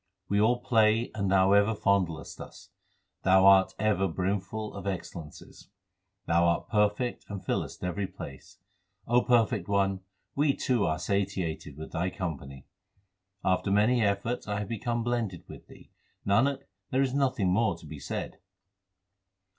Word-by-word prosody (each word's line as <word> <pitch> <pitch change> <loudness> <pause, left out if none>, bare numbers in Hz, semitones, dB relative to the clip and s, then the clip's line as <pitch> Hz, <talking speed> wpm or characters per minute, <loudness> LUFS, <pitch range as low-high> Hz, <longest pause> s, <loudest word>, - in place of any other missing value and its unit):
We 100 +1 +2
all 120 +3 +3
play 110 -1 +3
and 100 -3 -1
Thou 95 0 +4
ever 100 +2 +4
fondlest 95 -6 -1
us: - - -12 0.5
Thou 95 0 +5
art 95 -1 +6
ever 100 -2 +1
brimful 100 +4 -3
of 100 -1 -7
excellences. 85 -4 -7 0.6
Thou 85 +1 +3
art 85 0 +1
perfect 105 +3 0
and 100 -2 -7
fillest - - -3
every 95 +2 -2
place: 70 -6 -11 0.5
O 120 +1 +3
Perfect 115 -6 +2
One, 100 -1 +1 0.4
we 145 0 +2
too 120 -7 +1
are 80 -1 0
satiated 95 -7 -2
with 80 - -8
Thy 90 +3 -1
company. 70 -7 -6 0.8
After 95 +1 +1
many 110 +5 +3
efforts 105 +4 -1
I 105 -1 -2
have 105 0 -4
become 115 +1 -2
blended 115 -7 -2
with - - -12
Thee; - - -17 0.3
Nanak, 135 +8 +2 0.3
there 130 +1 +2
is 130 -1 -1
nothing 130 -9 +1
more 110 -4 +1
to 85 - -15
be 75 -1 -9
said. 65 - -5
100 Hz, 145 wpm, -28 LUFS, 90-115 Hz, 0.8 s, art